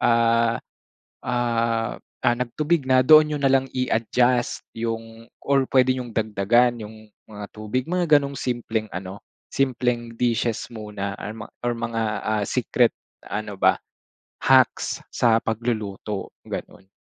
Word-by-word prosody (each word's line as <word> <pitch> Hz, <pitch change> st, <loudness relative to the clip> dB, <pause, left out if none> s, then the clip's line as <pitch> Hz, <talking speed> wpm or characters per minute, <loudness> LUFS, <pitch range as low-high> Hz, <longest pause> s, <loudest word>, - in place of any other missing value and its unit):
ah, 115 Hz, 0 st, +3 dB, 0.7 s
ah, 115 Hz, -2 st, 0 dB, 0.4 s
nagtubig 140 Hz, +4 st, -1 dB
na, 130 Hz, -1 st, +5 dB
doon 155 Hz, -1 st, +8 dB
niyo -, -, -3 dB
na 135 Hz, -1 st, +2 dB
lang 135 Hz, -1 st, +2 dB
i-adjust 125 Hz, 0 st, +1 dB
yung 115 Hz, 0 st, -5 dB
or 140 Hz, -1 st, +2 dB
puwede 130 Hz, -1 st, +4 dB
niyong 125 Hz, -2 st, -5 dB
dagdagan 110 Hz, +2 st, +2 dB
yung 110 Hz, +1 st, -11 dB, 0.2 s
mga 105 Hz, -1 st, -7 dB
tubig," 110 Hz, +4 st, -3 dB
mga 170 Hz, -4 st, +4 dB
ganong 140 Hz, 0 st, -5 dB
simpleng 115 Hz, -3 st, -2 dB
ano, 95 Hz, +2 st, -7 dB, 0.3 s
simpleng 125 Hz, -3 st, 0 dB
dishes 120 Hz, -2 st, 0 dB
muna 105 Hz, -3 st, -5 dB
or 105 Hz, -, -5 dB
ma 105 Hz, -, -7 dB, 0.2 s
or 120 Hz, 0 st, 0 dB
mga 115 Hz, -1 st, -2 dB, 0.5 s
secret -, -, +2 dB, 0.4 s
ano 105 Hz, 0 st, -4 dB
ba, -, -, +5 dB, 0.7 s
hacks 130 Hz, -2 st, +3 dB
sa 115 Hz, -2 st, +3 dB
pagluluto, 110 Hz, -3 st, -3 dB
ganun. 95 Hz, -, -8 dB
115 Hz, 125 wpm, -23 LUFS, 110-125 Hz, 0.7 s, doon